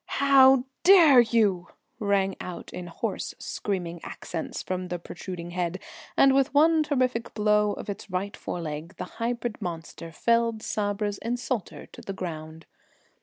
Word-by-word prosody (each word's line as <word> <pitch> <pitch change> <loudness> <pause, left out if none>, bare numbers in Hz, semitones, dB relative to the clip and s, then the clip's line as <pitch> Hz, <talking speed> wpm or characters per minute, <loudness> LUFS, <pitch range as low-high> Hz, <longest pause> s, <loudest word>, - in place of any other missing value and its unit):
"How 270 -2 +6 0.2
dare 335 -8 +8
you?" 215 -6 +1 0.3
rang 200 -2 +1
out 180 -1 -8
in 180 -1 -6
hoarse 170 - -4
screaming 175 -4 -4
accents 165 -2 -6
from 185 0 -3
the 180 0 -3
protruding 175 0 -8
head, 180 +1 -2 0.4
and 270 -1 +6
with 275 +1 +2
one 320 +2 +5
terrific 255 -6 -1
blow 210 -1 +3
of - - -8
its 205 0 -6
right 190 +2 -3
fore 175 - -5
leg 155 +2 -6
the - - -4 0.2
hybrid 235 -1 -2
monster 165 -1 -6
felled 230 +4 +1
Sabra's 205 0 -2
insulter 240 -3 -3
to - - -13
the 195 - -6
ground. 160 -3 -7
205 Hz, 145 wpm, -26 LUFS, 175-240 Hz, 0.4 s, dare